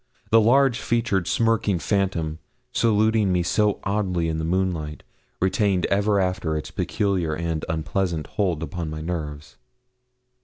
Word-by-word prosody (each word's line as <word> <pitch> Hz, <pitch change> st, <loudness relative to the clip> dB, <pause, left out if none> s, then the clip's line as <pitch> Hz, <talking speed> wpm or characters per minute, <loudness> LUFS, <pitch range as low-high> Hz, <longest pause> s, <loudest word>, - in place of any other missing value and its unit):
The 115 Hz, 0 st, +7 dB
large 130 Hz, +2 st, +4 dB
featured, 115 Hz, -8 st, 0 dB
smirking 115 Hz, -4 st, +2 dB
phantom, 85 Hz, -5 st, -1 dB, 0.3 s
saluting 110 Hz, -2 st, +2 dB
me 90 Hz, -1 st, +2 dB
so 105 Hz, +3 st, +1 dB
oddly 95 Hz, -5 st, 0 dB
in 80 Hz, 0 st, -2 dB
the -, -, -2 dB
moonlight, 85 Hz, -3 st, -1 dB, 0.4 s
retained 95 Hz, -1 st, +1 dB
ever 100 Hz, +1 st, +2 dB
after 90 Hz, -4 st, 0 dB
its 75 Hz, -, -6 dB
peculiar 95 Hz, -6 st, -1 dB
and 80 Hz, -1 st, -3 dB
unpleasant 80 Hz, 0 st, -1 dB
hold 90 Hz, -6 st, -1 dB
upon 80 Hz, +1 st, -4 dB
my 80 Hz, 0 st, -5 dB
nerves. 80 Hz, -2 st, -5 dB
90 Hz, 130 wpm, -24 LUFS, 80-105 Hz, 0.4 s, The